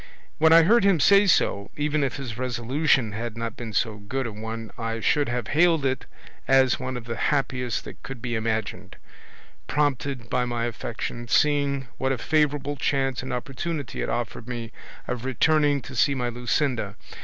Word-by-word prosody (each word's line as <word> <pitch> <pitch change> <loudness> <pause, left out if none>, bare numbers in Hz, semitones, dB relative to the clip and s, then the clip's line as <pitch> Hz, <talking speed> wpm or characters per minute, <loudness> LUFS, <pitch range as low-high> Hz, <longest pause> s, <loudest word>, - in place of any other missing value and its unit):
When 160 +1 +5
I 165 0 +8
heard 225 +6 +5
him 195 -4 +4
say 200 +7 +6
so, 100 - +2
even 150 0 +1
if 135 - -1
his 130 -5 -5
resolution 125 +1 +1
had 115 +2 -5
not 115 0 -4
been 115 -2 -6
so 110 0 0
good 130 +6 -3
a 115 - -3
one 110 +1 -6
I 115 -1 -3
should 145 +4 +2
have 120 -3 -3
hailed 160 -1 +3
it 130 -1 -1 0.4
as 130 -1 +4
one 130 -1 -4
of 120 - -7
the 115 0 -4
happiest 130 -4 -1
that - - -10
could 135 -2 -8
be 120 0 -4
imagined, 110 -1 -2 0.7
prompted 140 -4 -1
by 125 +2 0
my 120 -1 -2
affection, 120 0 -5
seeing 140 -1 +2
what 130 0 +1
a 135 - 0
favourable 145 0 0
chance 135 -1 0
and 130 +1 -6
opportunity 135 +3 -4
it - - -2
offered 120 0 -3
me 120 -2 -5 0.4
of 125 -1 -3
returning 145 +1 +2
to 130 - -9
see 140 +3 +3
my 125 -2 -1
Luscinda. 120 -3 -1
130 Hz, 180 wpm, -25 LUFS, 115-145 Hz, 0.7 s, I